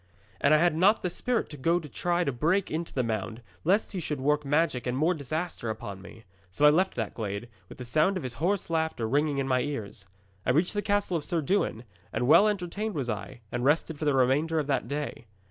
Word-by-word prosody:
'And 140 - +3
I 155 - +7
had 170 0 +3
not 195 +7 +4
the 180 - -1
spirit 245 +5 -1
to 150 - -9
go 165 +6 +2
to 155 - -9
try 175 +4 0
to 140 - 0
break 170 +10 +1
into 165 +2 -3
the 130 - 0
mound, 110 +1 -3 0.2
lest 195 +6 +2
he 190 - -3
should 150 -4 -3
work 150 +2 +1
magic 145 -3 +1
and 125 +1 -1
more 160 +5 +3
disaster 155 -3 -4
upon 100 -3 -6
me. 115 +3 -13 0.3
So 120 +11 +1
I 150 - +9
left 185 +5 +2
that 110 -4 -3
glade, 105 +1 -4 0.2
with - - -11
the 125 - -7
sound 155 +10 +2
of 185 - -5
his 125 -2 -4
hoarse 185 0 0
laughter 160 -8 0
ringing 145 +3 +1
in 135 -1 -1
my 130 -1 +2
ears. 110 -8 -5 0.4
'I 125 - +2
reached 175 +5 +1
the 205 - 0
castle 205 -3 0
of 155 - -5
Sir 170 +1 -1
Dewin, 145 - 0 0.3
and 120 +2 -1
well 195 +8 +7
entertained 205 +1 -2
was 130 -5 -1
I, 105 +3 -6
and 120 0 -2
rested 150 +2 +1
for 155 - -2
the 145 -2 +3
remainder 140 +6 +2
of 155 - +1
that 135 -3 -1
day. 145 -5 -4
150 Hz, 235 wpm, -28 LUFS, 125-175 Hz, 0.4 s, I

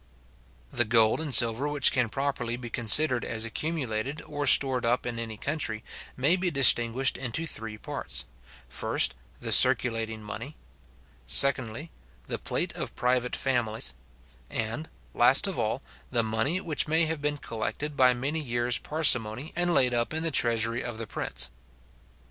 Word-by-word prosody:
The 120 - +1
gold 115 +3 +2
and 155 -3 -5
silver 120 +3 +5
which 145 -2 +2
can 125 -3 -1
properly 135 -3 -4
be 120 -2 -9
considered 125 +2 +4
as 110 0 -3
accumulated, 135 0 -4
or 145 -1 -5
stored 130 -2 +5
up 120 +2 -1
in 120 -1 -5
any 115 -2 -6
country, 125 -5 -4 0.3
may 140 +7 +2
be 185 -1 -2
distinguished 130 -3 +5
into 130 +5 -4
three 110 -8 -4
parts; - - -5 0.4
first, - - 0 0.3
the - - -5
circulating 110 -2 +3
money; 115 +7 -9 0.7
secondly, 140 +2 +4 0.3
the - - -5
plate - - -3
of - - -6
private 125 0 -1
families; 110 - -2 0.6
and, 115 +8 -5 0.2
last - - +5
of - - -3
all, - - -3 0.3
the 115 - +1
money 110 +11 -1
which 160 -5 -2
may 160 +2 +2
have 160 -2 -4
been 145 0 -2
collected 145 +5 -5
by 130 -2 +4
many 135 +6 -3
years 120 -3 -1
parsimony, 130 -4 +1
and 175 +1 0
laid 125 -6 +3
up 120 +5 -2
in 160 - -2
the 165 - -1
treasury 115 -2 -1
of 120 -2 -7
the 115 - -6
prince. - - -3
125 Hz, 155 wpm, -26 LUFS, 115-145 Hz, 0.7 s, silver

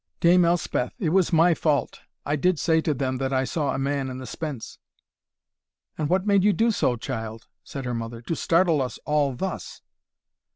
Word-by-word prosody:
"Dame 175 +1 +5
Elspeth, 170 -7 0
it 170 - -1
was 185 +1 +2
my 170 +1 +5
fault 150 -5 0 0.3
I 145 - 0
did 180 +4 +2
say 160 +1 +2
to 155 - 0
them, 130 0 -1
that 135 0 -1
I 130 -1 +1
saw 145 +1 -1
a - - -1
man 135 0 -1
in 130 - -6
the 130 - -7
spence." 145 -4 -6 1.2
"And 150 -1 -2
what 185 +2 +1
made 200 -2 +3
you 205 0 +4
do 230 +3 +2
so, 130 - +1
child," 115 -1 -6 0.2
said 135 -2 -7
her 125 - -2
mother, 115 0 -5
"to 165 - -2
startle 165 -3 +2
us 125 -3 -3
all 145 -3 +1
thus?" 190 +9 -5
150 Hz, 195 wpm, -25 LUFS, 130-170 Hz, 1.2 s, Dame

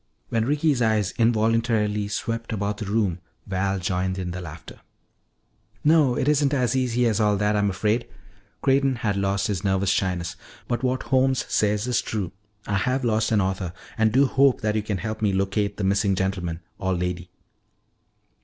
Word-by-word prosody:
When 115 -1 +1
Ricky's 145 -1 +1
eyes 110 -4 +1
involuntarily 110 -2 +2
swept 115 +2 -3
about 105 -1 -2
the 105 - -5
room, 100 -4 0 0.3
Val 95 0 -1
joined 95 0 -1
in 90 -2 -3
the 90 +1 -5
laughter. 80 -2 -10 1.0
"No, 150 -5 +4
it - - 0
isn't 145 -1 +3
as 125 -1 +1
easy 125 -2 +1
as 110 -2 +1
all 105 -2 +3
that, 105 +1 +1
I'm 100 -1 +2
afraid." 105 +5 0 0.6
Creighton 135 -1 +3
had 110 -4 -1
lost 100 0 0
his 100 -5 -2
nervous 95 -1 +1
shyness. 90 -2 -1 0.3
"But 120 -1 -1
what 130 0 0
Holmes 130 0 +2
says 105 +1 +1
is 125 -1 +1
true. 100 -6 -3 0.3
I 100 - 0
have 130 +4 0
lost 110 -1 +1
an 105 -2 +3
author 95 -2 -2 0.2
and 110 0 +2
do 135 +5 +4
hope 135 0 +3
that 105 0 0
you 110 - +1
can 105 -2 -3
help 110 +2 -5
me 105 -3 +2
locate 100 +1 0
the 105 - -3
missing 100 0 +2
gentleman 90 -3 -2 0.2
or 95 0 0
lady. 90 0 -3
105 Hz, 175 wpm, -24 LUFS, 95-120 Hz, 1.0 s, No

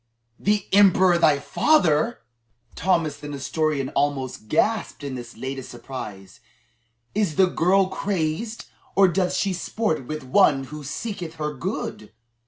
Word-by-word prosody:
"The 205 -1 +1
emperor 190 -3 +5
thy 155 -4 +5
father!" 190 - +2 0.5
Thomas 165 -5 0
the 145 +1 -9
Nestorian 145 0 -1
almost 135 -6 -2
gasped 220 - 0
in 140 -2 -4
this 120 -1 -8
latest 130 -1 -5
surprise. 115 -4 -8 0.7
"Is 200 -7 0
the 190 - +6
girl 185 +2 +3
crazed 190 +3 -2 0.3
or 195 0 +6
doth 180 0 0
she 195 -2 0
sport 175 - -2
with 155 -1 -5
one 135 0 +4
who 150 +3 -8
seeketh 170 - -5
her 150 -1 -3
good?" 135 - -5
155 Hz, 130 wpm, -24 LUFS, 135-190 Hz, 0.7 s, the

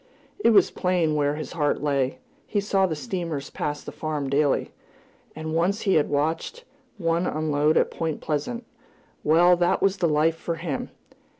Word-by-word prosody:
It 395 - +4
was 205 -5 +5
plain 180 -4 +1
where 145 -1 +1
his 155 - -6
heart 150 -3 0
lay. 140 -3 0 0.3
He 205 - 0
saw 195 -1 +2
the 160 - -2
steamers 170 - -4
pass 145 0 -3
the - - -7
farm 150 -3 -3
daily, 145 0 +1 0.6
and 155 0 -5
once 185 +6 +1
he 195 - +2
had 150 - +3
watched 160 - -1 0.3
one 170 -1 0
unload 155 0 +1
at - - +2
Point 160 -2 -3
Pleasant 230 - -3 0.6
well, 175 +4 +5
that 175 0 +2
was 195 0 +2
the 170 -3 +1
life 155 +2 +3
for 165 +1 -4
him! 165 -5 -4
160 Hz, 170 wpm, -25 LUFS, 150-180 Hz, 0.6 s, was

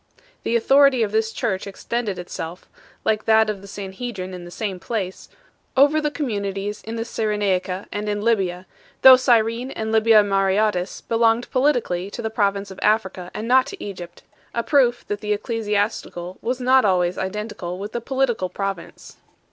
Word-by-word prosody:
The 235 - -1
authority 270 +1 +5
of 210 - -2
this 220 +1 +1
church 190 -3 -2
extended 205 0 -3
itself 175 -1 -7 0.4
like 215 -1 +1
that 220 -1 +4
of 200 -2 -8
the 200 - -12
Sanhedrin 195 -1 -6
in 180 -1 -8
the - - -9
same 190 0 -4
place 190 -3 -4 0.5
over 290 +3 +5
the 300 - 0
communities 205 -8 -3
in 225 +1 -6
the 225 0 -3
Cyrenaica 200 -4 -1
and 210 +1 -3
in 205 0 -1
Libya, 190 -6 0 0.4
though 265 -1 +11
Cyrene 235 -1 +2
and 220 -4 -4
Libya 220 -1 +5
Mareotis 195 -1 +1
belonged 230 +1 +2
politically 245 -9 +1
to 215 - -7
the 220 - -2
province 200 -3 0
of 190 - -10
Africa 190 -4 0
and 215 +2 -4
not 255 +1 +4
to 400 - -8
Egypt; 180 -4 -8 0.3
a 235 - 0
proof 250 -4 +2
that 205 0 -3
the 210 -1 0
ecclesiastical 205 -5 -2
was 250 +2 -2
not 255 +1 +4
always 180 -2 +1
identical 190 -2 -4
with 205 +3 -6
the 235 - -3
political 245 -7 0
province. 195 -2 -6
210 Hz, 165 wpm, -22 LUFS, 190-235 Hz, 0.5 s, though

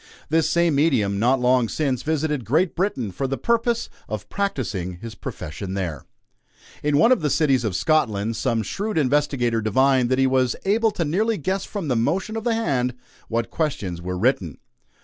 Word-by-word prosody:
This 160 +1 +2
same 170 -2 +2
medium, 125 -10 +2
not 125 +4 +3
long 125 -2 +3
since, 135 -6 -1
visited 150 -3 -1
Great 160 - +1
Britain 165 - -1
for 135 +9 -2
the 135 +1 -2
purpose 235 - 0 0.2
of 105 -1 -5
practicing 115 - -2
his 110 +6 -8
profession 95 +5 -6
there. 85 -7 -4 0.8
In 145 -1 +2
one 165 - +5
of 255 - +4
the 150 - +1
cities 135 -3 +2
of 105 -5 -1
Scotland, 115 - +1
some 115 -1 0
shrewd 205 - -3
investigator 135 -5 +1
divined 130 +3 +3
that 130 - +2
he 135 - +3
was 130 -2 +2
able 220 +3 +3
to 175 -5 -2
nearly 210 +8 +1
guess 190 +5 -2
from 200 -6 -5
the 130 - +1
motion 190 - 0
of 225 +1 -4
the 235 -2 +2
hand 130 - 0 0.3
what 115 0 -2
questions 120 - -2
were 90 +1 -4
written. 95 - 0
135 Hz, 180 wpm, -23 LUFS, 115-165 Hz, 0.8 s, one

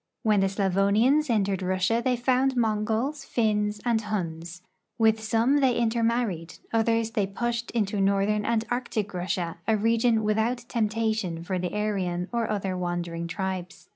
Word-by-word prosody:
^Vhen 210 -2 +4
the 195 - +3
Slavonians 200 +9 +2
entered 200 -4 +1
Russia 185 +5 +1
they 255 0 +2
found 255 +2 +1
Mongols, 225 +6 0
Finns, 210 -4 0
and 230 -2 +2
Huns; 175 -4 -4 0.3
with 220 -1 +3
.some 230 +6 +2
they 265 -4 +3
intermarried; 230 -7 0 0.2
others 225 0 +1
they 210 -4 0
pushed 235 +4 -3
into 205 -3 -1
northern 200 +2 +2
and 225 0 0
Arctic 225 -5 -2
Russia, 175 -2 -3
a 220 - +3
region 230 +1 +2
without 220 +3 0
temptation 220 -7 -1
for 185 +1 -2
the 180 0 -2
Aryan 190 -4 -1
or 235 -2 0
other 195 -3 -1
Avandering 175 -2 -3
tribes. 185 -1 -5
215 Hz, 145 wpm, -26 LUFS, 190-230 Hz, 0.3 s, ^Vhen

